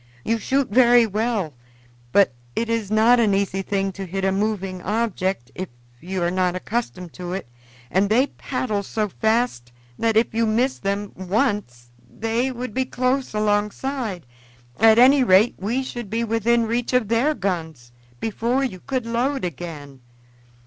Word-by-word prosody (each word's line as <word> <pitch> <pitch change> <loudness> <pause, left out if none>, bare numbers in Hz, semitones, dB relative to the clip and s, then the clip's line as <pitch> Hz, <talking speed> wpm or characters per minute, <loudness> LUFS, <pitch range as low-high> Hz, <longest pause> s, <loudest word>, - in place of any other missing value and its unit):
"You 230 0 +1
shoot 270 +5 +1
very 240 0 +6
well, 215 -6 -1 0.6
but 200 -7 +4 0.2
it 230 0 -1
is 225 -3 -1
not 225 +3 +5
an 210 -4 +3
easy 195 -1 0
thing 195 0 -1
to 195 0 -7
hit 190 +2 -2
a 190 - +2
moving 195 -2 -2
object 190 - -1
if 185 0 -5 0.3
you 185 +3 -3
are 175 - +1
not 180 -1 +1
accustomed 185 -3 -4
to 180 -1 -6
it, 190 - -5 0.4
and 195 +2 +2
they 245 +5 +4
paddle 255 -7 -3
so 210 +1 -2
fast 220 - 0 0.3
that 225 -1 +2
if 225 - +2
you 230 0 +1
miss 245 +5 +1
them 200 +1 -2
once 185 - -2 0.2
they 230 +4 -1
would 245 -2 -6
be 260 0 0
close 255 -1 -1
alongside 210 - -1 0.5
at 220 +1 +6
any 260 +3 +7
rate 205 +1 +5
we 235 +7 -1
should 240 -5 -6
be 230 +3 -1
within 230 +1 +2
reach 235 +2 -1
of 250 -4 +2
their 240 +8 +2
guns 160 - -4 0.3
before 235 +4 0
you 215 -9 -3
could 260 +3 -3
load 245 +2 -1
again. 145 -5 -7
215 Hz, 160 wpm, -22 LUFS, 190-240 Hz, 0.6 s, any